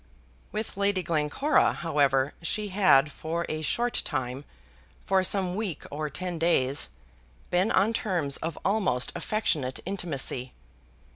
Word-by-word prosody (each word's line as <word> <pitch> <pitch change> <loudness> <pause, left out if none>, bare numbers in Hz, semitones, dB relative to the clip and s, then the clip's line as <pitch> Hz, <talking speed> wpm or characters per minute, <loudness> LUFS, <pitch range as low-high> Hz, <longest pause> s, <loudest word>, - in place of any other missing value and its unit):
With 215 -1 -4
Lady 200 -2 +1
Glencora, 165 - +2
however, 140 -4 +1
she 210 +5 -2
had 165 -7 +4
for 165 +3 -3
a 155 0 -3
short 240 +10 +1
time 130 -1 -3 0.6
for 190 -1 +3
some 185 -1 +1
week 200 -7 -3
or 150 +1 -3
ten 180 +2 -4
days, 140 -5 +2 0.6
been 180 +4 +3
on 205 +4 +3
terms 170 -11 0
of 165 -1 -4
almost 190 - +1
affectionate 150 -12 -1
intimacy. 150 -9 -2
170 Hz, 125 wpm, -27 LUFS, 145-195 Hz, 0.6 s, had